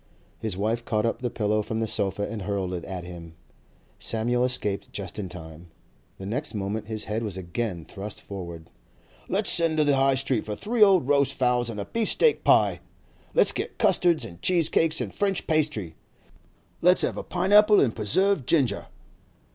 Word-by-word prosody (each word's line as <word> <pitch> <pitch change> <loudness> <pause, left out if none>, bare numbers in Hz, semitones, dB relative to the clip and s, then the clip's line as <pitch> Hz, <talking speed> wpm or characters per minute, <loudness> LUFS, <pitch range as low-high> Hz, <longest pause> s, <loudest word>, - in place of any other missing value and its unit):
His 105 -5 -3
wife 110 +4 -1
caught 110 -1 0
up 115 - -2
the 125 - -1
pillow 105 -2 0
from 110 +1 -4
the 115 - -1
sofa 100 -1 -1
and 105 0 -6
hurled 95 -2 -2
it 90 - -4
at 95 -2 -6
him. 85 -2 -10 0.6
Samuel 120 +2 0
escaped 105 -6 -1
just 100 0 -6
in 95 -3 -4
time. 80 -1 -11 0.5
The 95 - -8
next 125 +5 -3
moment 105 +1 -3
his 110 -1 -4
head 110 +2 -2
was 105 -5 -4
again 90 -1 -4
thrust 100 +2 -7
forward. 85 -5 -9 0.6
'Let's - - +1
send 165 -2 +2
to 155 - +4
the 145 -1 +3
High 135 0 +3
Street 130 -3 0
for 105 - -5
three 230 - -3
cold 190 -9 +6
roast 140 -1 +2
fowls 125 -2 +1
and 110 -2 -6
a 100 - -4
beef 230 -2 -1
steak 470 -2 +2
pie! - - +4 0.6
Let's - - +6
get - - -5
custards 170 -8 +3
and 85 -6 -11
cheese 170 -3 +2
cakes 165 0 +1
and - - -5
French 195 -2 -1
pastry! 150 - -1 0.9
Let's 180 +1 +4
have - - -1
a - - -4
pine 190 +2 -1
apple 210 0 +7
and 120 -5 +2
preserved 160 - +1
ginger! 140 -7 +1
110 Hz, 185 wpm, -25 LUFS, 100-145 Hz, 0.9 s, apple